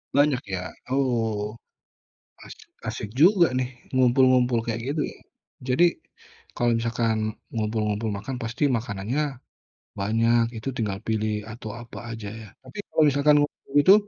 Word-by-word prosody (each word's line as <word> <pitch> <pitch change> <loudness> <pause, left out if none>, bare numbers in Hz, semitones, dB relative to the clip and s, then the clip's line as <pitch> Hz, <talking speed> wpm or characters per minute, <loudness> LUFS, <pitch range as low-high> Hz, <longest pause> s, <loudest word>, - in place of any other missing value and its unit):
Banyak 145 -2 +4
ya 95 -2 -4 0.2
oh, 115 -5 0 0.9
asik - - -13 0.2
asik 105 - -4
juga 175 -4 +6
nih 130 -1 0 0.2
ngumpul-ngumpul 125 -1 +4
kayak 115 -1 -2
gitu 155 - -1
ya, - - -15 0.5
jadi, 130 +6 +3 0.7
kalau 120 0 +2
misalkan 115 -1 0 0.4
ngumpul-ngumpul 110 -1 -1
makan 120 +6 -5
pasti 115 +5 -2
makanannya, 110 +4 -2 0.8
banyak 115 +3 +3
itu 110 - -7
tinggal 100 -4 -2
pilih 110 -1 0 0.2
atau 110 -1 -7
apa 120 - -11
aja 110 -2 -6
ya 110 - -10 0.2
tapi 130 0 -13
kalau 160 - +3
misalkan 145 +1 +4
waktu 145 - -7
itu, 185 +6 +8
115 Hz, 130 wpm, -25 LUFS, 110-130 Hz, 0.9 s, itu